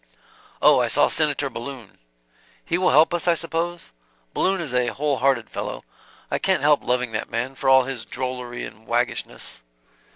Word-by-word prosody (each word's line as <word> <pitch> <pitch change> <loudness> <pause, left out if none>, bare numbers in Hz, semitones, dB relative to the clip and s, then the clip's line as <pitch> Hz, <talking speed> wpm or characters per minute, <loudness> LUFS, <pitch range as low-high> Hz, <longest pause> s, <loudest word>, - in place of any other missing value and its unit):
"Oh, 150 -3 +7
I 120 - +1
saw 130 +5 +3
Senator 145 -3 +1
Balloon" 120 -2 -8 0.7
"He 170 - 0
will 185 - +3
help 155 +5 +5
us, 175 +1 -1
I 170 - +5
suppose? 165 - -3 0.4
Balloon 190 0 +1
is 155 -7 -5
a 125 -1 +2
whole 140 +3 -1
hearted 130 -4 +2
fellow. - - -5 0.5
I - - 0
can't - - +1
help 150 0 +4
loving 125 -1 0
that - - -3
man, 120 +3 -2
for 135 0 -1
all 130 0 +7
his 130 -3 -4
drollery 125 -1 -4
and 110 +1 -13
waggishness. 120 - -2
135 Hz, 170 wpm, -23 LUFS, 120-150 Hz, 0.7 s, Oh